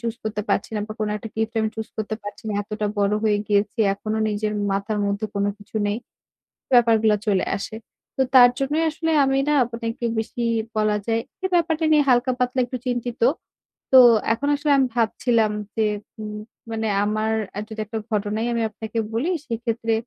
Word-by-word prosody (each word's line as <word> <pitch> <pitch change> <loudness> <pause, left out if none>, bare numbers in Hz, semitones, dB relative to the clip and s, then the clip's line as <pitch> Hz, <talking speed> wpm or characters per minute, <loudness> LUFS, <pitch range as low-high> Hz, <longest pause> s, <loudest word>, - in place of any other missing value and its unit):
choose 230 +1 -4
করতে 210 -1 -2
পারছি - - 0
না - - -1
বা 215 - -4
কোন 215 - 0
একটা 220 +2 -7
gift 220 0 -1
আমি 220 - +1
choose 220 0 -6
করতে 220 0 -3
পারছি 205 +2 -8
না। - - -1
এতটা 210 +1 -3
বড় 200 0 +2
হয়ে 210 -1 +3
গিয়েছি 210 +2 +1 0.2
এখনো 215 +2 -3
নিজের 210 0 -1 0.2
মাথার 200 +2 -1
মধ্যে 200 +2 -1
কোন 200 - 0
কিছু 210 +2 -9
নেই। 205 +1 0 0.8
ব্যাপারগুলা 225 -3 +5
চলে 195 -3 +2
আসে। 210 +2 -6 0.4
তো 265 - +3
তার 245 -1 +9
জন্যই 295 +4 0
আসলে 325 +1 -2
আমি 270 0 +1
না 300 - +3
আপনাকে 230 -1 -5 0.3
বেশি 230 +2 -3 0.3
বলা 215 -1 +2
যায় 225 0 +1 0.2
এই 375 - +2
ব্যাপারটা 325 -2 +2
নিয়ে 300 - +6
হালকা-পাতলা 250 0 +2
একটু 255 +1 -5
চিন্তিত। 245 -1 -2 0.7
তো 260 - +9 0.3
এখন 275 +5 -3
আসলে 290 0 0
আমি 265 -1 +3
ভাবছিলাম 225 -1 +2 0.2
যে 220 -1 +2 0.3
উম 210 -1 -5 0.3
মানে 220 0 -2 0.2
আমার 215 +1 0 0.4
যদি 220 0 -8
একটা 225 +2 -5
ঘটনাই 215 +2 -1
আমি 235 - 0
আপনাকে 220 +1 -7 0.2
বলি 255 +10 0 0.2
সেক্ষেত্রে 230 -1 -1
225 Hz, 175 wpm, -23 LUFS, 215-245 Hz, 0.8 s, তার